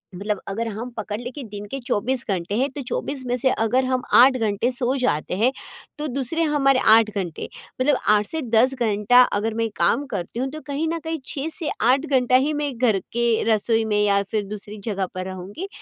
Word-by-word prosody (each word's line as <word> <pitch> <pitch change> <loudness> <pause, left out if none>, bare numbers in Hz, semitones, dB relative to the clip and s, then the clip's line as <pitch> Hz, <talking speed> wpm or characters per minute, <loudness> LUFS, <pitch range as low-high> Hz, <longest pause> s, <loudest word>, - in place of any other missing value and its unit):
मतलब 205 +2 -2
अगर 225 +4 -3
हम 225 +4 -5
पकड़ 210 -1 -4
ले 245 +1 -6
के 285 +1 -8
दिन 205 -2 -8
के 275 - -3
24 250 +1 0
घंटे 185 +1 -2
है 265 +3 +2
तो 290 - -4
24 275 -2 -3
में 245 - +1
से 260 +2 +2
अगर 250 +3 +1
हम 255 0 0
8 260 +2 +7
घंटे 220 0 0
सो 255 0 0
जाते 180 - -1
हैं, 235 +5 +3 0.5
तो 300 0 -3
दूसरे 275 +5 -1
हमारे 275 -4 +3
8 225 -1 +5
घंटे, 180 -5 -4 0.3
मतलब 270 +1 +3
8 210 0 +4
से 320 +6 -3
10 240 +1 +3
घंटा 235 0 +4
अगर 215 +2 -1
मैं 225 0 -1
काम 280 +5 +2
करती 180 +6 -4
हूँ 260 - 0
तो 310 +1 -8
कहीं 290 +3 -1
न 335 0 -2
कहीं 320 0 -3
6 290 +3 -3
से 315 - -2
8 260 +6 +3
घंटा 255 -4 +2
ही 275 +4 +3
मैं 295 -1 -2
घर 225 -5 +2
के 235 -1 +1
रसोई 225 +1 +2
में 210 -1 +1
या 200 -1 +3
फिर 215 -2 -1
दूसरी 210 +1 -8
जगह 200 -4 -1
पर 185 0 -4
रहूँगी। 190 - -7
235 Hz, 215 wpm, -23 LUFS, 210-270 Hz, 0.5 s, 8